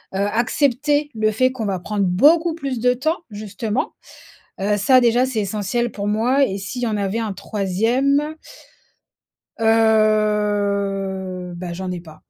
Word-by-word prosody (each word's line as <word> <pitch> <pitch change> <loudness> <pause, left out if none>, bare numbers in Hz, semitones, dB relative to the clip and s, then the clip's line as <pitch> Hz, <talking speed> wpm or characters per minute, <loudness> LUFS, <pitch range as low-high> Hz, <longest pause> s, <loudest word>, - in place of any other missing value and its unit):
heu, - - -1
accepter 280 +7 +1
le 215 0 +1
fait 255 +4 +2
qu'on 235 -4 -4
va 195 -3 -2
prendre 205 +3 -2
beaucoup 315 - +4
plus 275 -6 -4
de 250 +2 +3
temps, 315 +7 -1
justement, 210 +2 -3 0.7
heu, 205 +1 +1
ça 255 +6 +5
déjà 245 +1 +3
c'est 250 -4 -2
essentiel 210 +4 -2
pour 200 -1 -4
moi 245 +6 +2
et 195 +1 -4
s'il 215 +6 -6
y 240 - +1
en 215 - -1
avait 200 +2 -1
un 220 -2 -3
3° 240 - 0 1.2
heu, 205 -4 +1
bah 175 0 -6
j'en 185 +2 -5
n'ai 180 -1 -4
pas. 155 -2 -15
215 Hz, 150 wpm, -20 LUFS, 200-250 Hz, 1.2 s, ça